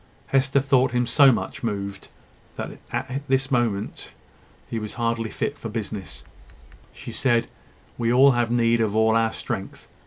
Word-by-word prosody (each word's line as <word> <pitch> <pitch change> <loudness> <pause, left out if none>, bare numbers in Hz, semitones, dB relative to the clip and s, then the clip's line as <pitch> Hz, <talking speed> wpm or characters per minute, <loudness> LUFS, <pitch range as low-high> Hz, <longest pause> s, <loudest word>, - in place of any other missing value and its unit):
Hester 135 0 +3
thought 130 -2 +2
him 125 0 +2
so 135 +3 +6
much - - -3
moved, 100 -4 -4 0.5
that - - -4
he - - -10
was - - -13
at 135 +2 -3
this 135 0 +1
moment 115 -5 -1 0.9
hardly 115 -1 -1
fit 145 - -3
for 115 - -5
business. 105 -5 -6 0.7
She - - -9
said: 120 -3 +1 0.5
"We 115 0 +1
all 135 +3 +7
have 120 -2 +1
need 115 -1 +2
of 110 -2 0
all 110 0 +4
our 115 0 +2
strength. - - -6
120 Hz, 155 wpm, -24 LUFS, 110-130 Hz, 0.9 s, all